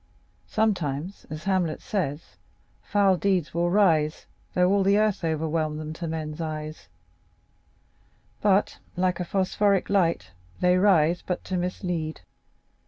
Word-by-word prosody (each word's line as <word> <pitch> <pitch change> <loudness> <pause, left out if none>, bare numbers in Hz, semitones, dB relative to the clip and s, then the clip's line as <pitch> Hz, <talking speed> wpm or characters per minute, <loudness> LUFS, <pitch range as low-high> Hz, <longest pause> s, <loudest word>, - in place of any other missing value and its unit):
Sometimes, 185 -5 -1
as 155 0 -6
Hamlet 185 -5 0
says: 165 -8 -3 0.5
'Foul 200 -2 +2
deeds 185 -4 0
will 170 +1 +1
rise, 165 -6 +2 0.3
Though 180 +1 +4
all 200 0 +3
the 200 +1 +4
earth 215 -3 +1
o'erwhelm 160 -1 -1
them, 155 0 -5
to 170 +1 -5
men's 160 0 -4
eyes;' 155 - -5 1.5
but, 200 -1 +2 0.2
like 180 -1 +1
a - - 0
phosphoric 195 +1 +1
light, 165 - +1 0.3
they 180 0 +4
rise 180 -3 +4
but 180 - -4
to 185 - -4
mislead. 175 -3 -3
175 Hz, 125 wpm, -26 LUFS, 155-195 Hz, 1.5 s, Though